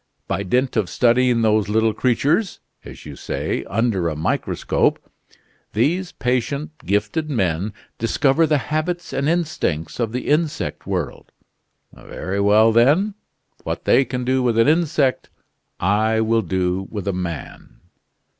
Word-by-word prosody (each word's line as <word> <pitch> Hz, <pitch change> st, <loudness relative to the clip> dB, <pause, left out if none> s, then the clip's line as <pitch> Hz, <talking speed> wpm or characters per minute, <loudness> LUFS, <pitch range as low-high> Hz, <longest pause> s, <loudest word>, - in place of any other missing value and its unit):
By -, -, -1 dB
dint 125 Hz, +7 st, 0 dB
of 100 Hz, -5 st, 0 dB
studying 120 Hz, -1 st, +3 dB
those 110 Hz, -2 st, +2 dB
little 110 Hz, +1 st, +2 dB
creatures 145 Hz, -, +1 dB, 0.2 s
as -, -, -11 dB
you -, -, -8 dB
say -, -, -3 dB
under 100 Hz, -6 st, 0 dB
a 75 Hz, -, -4 dB
microscope, 80 Hz, +2 st, 0 dB, 0.8 s
these 170 Hz, -, 0 dB
patient, 130 Hz, +4 st, -2 dB
gifted 105 Hz, -, -1 dB
men 95 Hz, -, 0 dB, 0.3 s
discover 135 Hz, +7 st, +2 dB
the 150 Hz, -1 st, +3 dB, 0.2 s
habits 175 Hz, +3 st, -2 dB
and 140 Hz, +2 st, 0 dB
instincts 150 Hz, -, -2 dB
of 115 Hz, -2 st, 0 dB
the 125 Hz, +2 st, -4 dB
insect 150 Hz, +1 st, -1 dB
world. -, -, -4 dB, 0.6 s
Very 95 Hz, +2 st, -5 dB
well, 105 Hz, +3 st, +5 dB
then. 145 Hz, -, +3 dB, 0.5 s
What -, -, -4 dB
they 135 Hz, -, +5 dB
can 125 Hz, -1 st, -4 dB
do 130 Hz, +1 st, +1 dB
with 120 Hz, -3 st, +1 dB
an 115 Hz, -, +4 dB
insect, 150 Hz, -4 st, +1 dB, 0.5 s
I 110 Hz, +4 st, +2 dB
will 115 Hz, +1 st, +2 dB
do 95 Hz, 0 st, -1 dB
with 100 Hz, -3 st, -6 dB
a 100 Hz, -, 0 dB
man!" 85 Hz, -4 st, -6 dB
115 Hz, 135 wpm, -21 LUFS, 100-145 Hz, 0.8 s, well